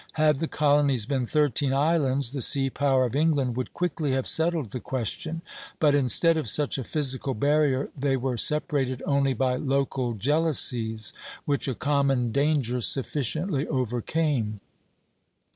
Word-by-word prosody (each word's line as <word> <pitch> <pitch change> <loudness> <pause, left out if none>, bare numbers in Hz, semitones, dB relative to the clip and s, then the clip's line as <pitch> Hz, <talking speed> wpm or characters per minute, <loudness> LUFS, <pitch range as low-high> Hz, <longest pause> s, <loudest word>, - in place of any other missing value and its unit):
Had 155 -3 +2
the 165 - -1
colonies 145 -6 +2
been 130 -1 -1
thirteen 145 -2 +1
islands, 140 -4 +1
the 140 -2 -4
sea 135 +2 +3
power 135 -2 +2
of 120 - -4
England 145 -5 +1
would 130 0 -4
quickly 160 -5 -1
have 130 -1 -1
settled 160 - 0
the 125 - -4
question; 155 +8 -4 0.4
but 150 -2 +4
instead 145 +4 +3
of 150 -8 -1
such 145 +1 0
a - - -3
physical 135 -2 -2
barrier 140 +2 +1
they 135 -1 0
were 130 0 -2
separated 135 -1 0
only 140 -2 +1
by 125 +1 0
local 135 -3 -1
jealousies 120 -4 0 0.3
which 140 -1 -1
a 130 - -2
common 140 -4 0
danger 140 -3 0
sufficiently 145 - -1
overcame. 125 -2 -1
140 Hz, 145 wpm, -26 LUFS, 125-150 Hz, 0.4 s, but